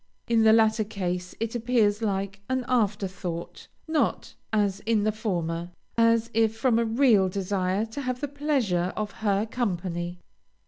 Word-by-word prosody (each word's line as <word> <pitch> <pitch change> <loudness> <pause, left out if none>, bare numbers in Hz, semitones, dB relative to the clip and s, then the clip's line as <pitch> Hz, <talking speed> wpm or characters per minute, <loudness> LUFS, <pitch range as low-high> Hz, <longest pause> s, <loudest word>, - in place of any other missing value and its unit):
In 230 -1 +3
the 220 0 +6
latter 220 0 +4
case 180 -4 -4
it 225 0 -2
appears 230 -3 +2
like 200 -1 -2
an 260 -1 0
after 210 -5 +1
thought, 175 -2 -6 0.2
not, 315 -1 0 0.2
as 205 -3 +1
in 220 -2 +3
the 215 - +2
former, 175 -6 -2 0.3
as 230 0 +3
if 225 0 +2
from 230 0 +2
a 235 - +2
real 225 -5 +4
desire 190 +1 -1
to 225 +5 -6
have 255 -2 -2
the 290 - -2
pleasure 265 - 0
of 210 -1 -2
her 205 -1 +2
company. 180 -6 -3
215 Hz, 155 wpm, -26 LUFS, 190-230 Hz, 0.3 s, the